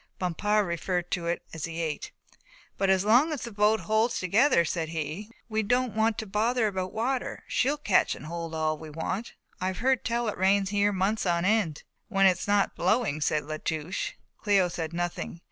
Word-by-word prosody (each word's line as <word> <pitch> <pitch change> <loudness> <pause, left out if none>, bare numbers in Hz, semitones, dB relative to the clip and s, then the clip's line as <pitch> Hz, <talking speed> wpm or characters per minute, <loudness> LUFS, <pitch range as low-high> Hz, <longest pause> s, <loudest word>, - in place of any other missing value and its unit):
Bompard 205 +4 +1
referred 175 0 -2
to 170 -2 -1
it 170 - -1
as 160 -2 -4
he 165 0 -6
ate. 160 -3 -3 0.6
"But 195 0 0
as 190 0 +3
long 250 +9 +5
as 300 - -3
the 235 - -6
boat 210 +1 +2
holds 220 +2 +1
together," 195 +1 +3
said 160 0 -2
he, 165 +6 -4 0.2
"we 220 -1 0
don't 245 +1 0
want 220 0 +2
to 220 - -3
bother 220 +4 +1
about 190 -3 -2
water; 250 +3 -2
she'll 280 +4 +1
catch 210 -10 +2
and - - -10
hold 165 0 -5
all 155 -1 0
we 160 - -9
want. 165 +8 -4 0.2
I've 185 0 -2
heard 260 +1 +1
tell 235 0 -1
it 210 - -3
rains 195 +1 +3
here 205 0 +2
months 200 +2 0
on 170 0 +1
end." 200 -7 +1 0.2
"When 195 -2 +3
it's 185 0 +3
not 205 -1 +2
blowing," 180 - +1
said 150 0 +1
La 155 +1 -4
Touche. 160 +3 -3 0.3
Cléo 195 -4 +3
said 165 -2 -4
nothing. 175 0 -4
195 Hz, 195 wpm, -28 LUFS, 170-220 Hz, 0.6 s, long